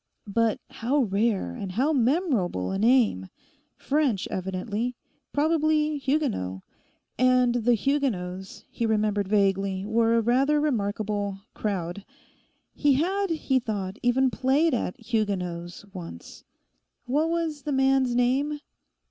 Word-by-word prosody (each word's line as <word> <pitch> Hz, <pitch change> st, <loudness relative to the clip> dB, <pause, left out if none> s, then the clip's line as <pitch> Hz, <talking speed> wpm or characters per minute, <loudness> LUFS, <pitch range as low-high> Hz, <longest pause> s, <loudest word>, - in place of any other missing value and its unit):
But 230 Hz, -1 st, +2 dB
how 265 Hz, +5 st, +1 dB
rare 200 Hz, -, 0 dB
and 185 Hz, -, -6 dB
how 275 Hz, +9 st, +1 dB
memorable 250 Hz, -, +1 dB
a 195 Hz, -, -2 dB
name! 225 Hz, -, +3 dB, 0.5 s
French 275 Hz, -9 st, 0 dB
evidently; 205 Hz, +6 st, -3 dB, 0.4 s
probably 305 Hz, 0 st, +1 dB
Huguenot. 265 Hz, -, -1 dB, 0.6 s
And 255 Hz, -1 st, +4 dB
the 240 Hz, 0 st, +2 dB
Huguenots, 200 Hz, -7 st, -2 dB
he 230 Hz, -, -1 dB
remembered 210 Hz, -2 st, +1 dB
vaguely, 195 Hz, -1 st, +1 dB
were 225 Hz, +2 st, +2 dB
a 230 Hz, -, +3 dB
rather 270 Hz, +6 st, +2 dB
remarkable 205 Hz, -6 st, -1 dB
'crowd.' 195 Hz, -2 st, -3 dB, 0.7 s
He 290 Hz, -1 st, +3 dB
had, 380 Hz, +8 st, 0 dB
he 290 Hz, -5 st, +1 dB
thought, 205 Hz, -4 st, -4 dB
even 255 Hz, +2 st, +2 dB
played 275 Hz, +6 st, +2 dB
at 230 Hz, -6 st, -2 dB
'Huguenots' 195 Hz, -6 st, -3 dB
once. 165 Hz, -, -9 dB, 0.6 s
What 295 Hz, +6 st, +1 dB
was 330 Hz, -3 st, -2 dB
the 295 Hz, -, -4 dB
man's 265 Hz, -2 st, +2 dB
name? 270 Hz, +5 st, +1 dB
235 Hz, 115 wpm, -26 LUFS, 200-275 Hz, 0.7 s, And